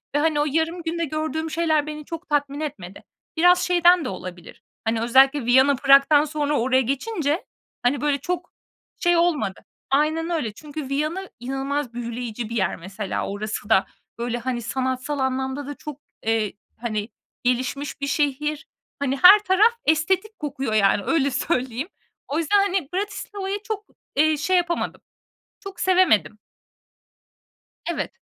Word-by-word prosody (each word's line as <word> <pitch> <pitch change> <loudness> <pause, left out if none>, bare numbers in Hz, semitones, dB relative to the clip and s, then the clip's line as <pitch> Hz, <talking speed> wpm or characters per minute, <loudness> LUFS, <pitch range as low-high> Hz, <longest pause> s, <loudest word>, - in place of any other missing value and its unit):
ve, - - +4
hani, 305 -1 +2
o 295 - +2
yarım 325 +4 0
günde 335 0 -1
gördüğüm 315 +1 -3
şeyler 315 -2 +1
beni 300 -1 -6
çok 330 0 -8
tatmin 285 -1 0
etmedi. 200 -12 -6 0.3
Biraz 355 +2 +6
şeyden 350 -1 +4
de - - -2
olabilir. 180 -2 -9 0.2
Hani, 225 0 0
özellikle 265 +3 +4
Viyana, 265 +3 +5
Prag'dan 275 +3 +5
sonra 295 -1 -1
oraya 260 +2 +3
geçince, 295 - -1 0.4
hani, 250 +2 +1
böyle, 290 -1 +1
çok 355 +2 -4 0.5
şey 350 -1 +3
olmadı. 315 - +1 0.3
Aynen 315 +4 +1
öyle. 260 -11 -2
Çünkü 295 +1 -7
Viyana 310 +7 -2
inanılmaz 270 +1 -3
büyüleyici 235 -1 -5
bir 235 - -5
yer 190 -5 +1
mesela. 195 +3 -4
Orası 210 +1 -4
da, 200 -3 +4 0.3
böyle, 240 0 -2
hani, 240 0 -3
sanatsal 260 +4 -2
anlamda 265 +1 -2
da 290 - -5
çok, 295 0 -9 0.3
eee, 225 -2 +1 0.2
hani, 220 -2 -3 0.3
gelişmiş 260 +4 -1
bir 280 - -1
şehir. 295 +2 -1 0.3
Hani, 275 -1 -1
her 395 +4 +10
taraf 410 +5 +4
estetik 380 +7 +1
kokuyor, 275 -5 -3
yani, 200 -1 +3
öyle 280 -4 +2
söyleyeyim. 255 0 -1 0.4
O 290 - -2
yüzden, 335 +5 +2
hani, 385 -7 0
Bratislava'yı 400 0 -3
çok, 420 -1 -4 0.3
eee, 310 +1 +3
şey 365 +6 +2
yapamadım, 345 -1 -1 0.6
çok 390 -3 -10
sevemedim. 220 - +3 1.5
Evet. - - -3
290 Hz, 145 wpm, -23 LUFS, 245-330 Hz, 1.5 s, her